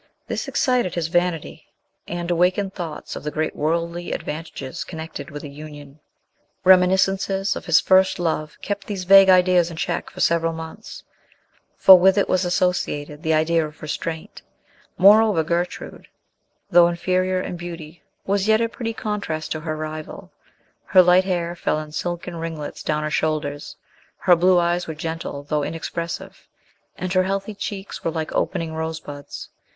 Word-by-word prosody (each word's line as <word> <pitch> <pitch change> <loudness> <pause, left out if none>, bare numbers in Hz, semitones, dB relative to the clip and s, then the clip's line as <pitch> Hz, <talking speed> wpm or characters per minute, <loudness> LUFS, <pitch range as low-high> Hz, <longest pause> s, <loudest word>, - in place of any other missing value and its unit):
This - - -4
excited 250 -8 +1
his 165 -2 -1
vanity, 175 -2 -1 0.4
and 175 0 -3
awakened 185 +3 +1
thoughts 170 -5 -6
of - - -6
the 150 - -2
great 155 +1 -2
worldly 170 +3 -2
advantages 150 -4 -6
connected 160 -1 -8
with 145 -1 -8
a - - -6
union. 145 0 -11 0.6
Reminiscences 190 +1 +3
of - - -8
his 165 -2 +6
first 190 0 +4
love 160 -3 -2
kept 200 -1 -4
these 195 -3 -4
vague 195 +1 +7
ideas 180 -2 +5
in 165 - -9
check 170 +1 -2
for - - -13
several 165 0 +2
months; 160 +7 -9 0.7
for 190 -1 +9
with 190 +2 +4
it 200 - +2
was 185 0 +1
associated 175 -5 -1
the 160 -1 +1
idea 160 +1 +2
of 150 0 -8
restraint. 160 +1 -5 0.6
Moreover, 205 -2 +6
Gertrude, 170 +2 -3 0.6
though 175 -1 +7
inferior 185 +2 0
in 185 - -4
beauty, 170 -2 -8 0.2
was 200 +1 0
yet 220 0 +4
a 230 - +1
pretty 230 -1 -5
contrast 205 -8 -4
to 155 - -2
her 155 0 -4
rival. 155 0 -7 0.5
Her 185 - +6
light 180 +1 +5
hair 175 -2 -2
fell 160 - -1
in 155 0 -6
silken 175 +2 -4
ringlets 165 -3 -6
down 150 0 -1
her 155 - -3
shoulders, 150 -2 -2 0.4
her 180 - +4
blue 180 +2 +4
eyes 175 0 +1
were 160 - -5
gentle 160 -2 -5
though 150 +1 -1
inexpressive, 165 +2 -5 0.5
and 185 +1 -3
her 185 - +4
healthy 195 +2 -2
cheeks 200 -1 -6
were - - 0
like 160 -1 -4
opening 165 -4 -1
rosebuds. 160 -3 -6
170 Hz, 155 wpm, -22 LUFS, 155-185 Hz, 0.7 s, for